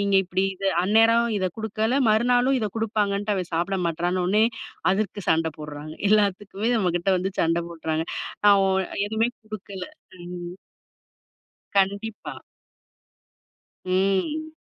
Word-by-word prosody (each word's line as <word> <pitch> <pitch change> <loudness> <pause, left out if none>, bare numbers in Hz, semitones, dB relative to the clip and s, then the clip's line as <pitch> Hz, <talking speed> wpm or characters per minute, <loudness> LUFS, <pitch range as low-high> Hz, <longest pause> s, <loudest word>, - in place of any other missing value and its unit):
நீங்க 200 -1 +1
இப்டி, 185 +1 0
இத 195 - -8 0.2
அந்நேரம் 225 +3 +4
இத 185 - -1
குடுக்கல, 220 +2 -1 0.2
மறுநாளு 245 +3 +3
இத 215 - 0
குடுப்பாங்கன்ட்டு, 205 -2 0
அவன் 180 -2 -3
சாப்பிட 175 +4 0
மாட்றானோனே, 180 +5 +1 0.5
அதுக்கு 205 0 -2
சண்டை 160 -1 +2
போட்றாங்க. 150 0 -8 0.2
எல்லாத்துக்குமே 205 +1 +1
நம்ம 185 -5 +1
கிட்ட 175 - -4
வந்து 190 +1 -2
சண்ட 165 +1 +2
போட்றாங்க. 160 -1 -2 0.4
அ, - - +9 0.2
ஓ - - +2 0.2
நான் 200 - -3
எதுவுமே 220 +2 +1 0.2
கொடுக்கல. 205 -3 -7 0.4
ம். 175 0 -7 1.2
கண்டிப்பா. 200 +3 0 1.5
ம். 195 - 0
200 Hz, 120 wpm, -24 LUFS, 180-220 Hz, 1.5 s, அ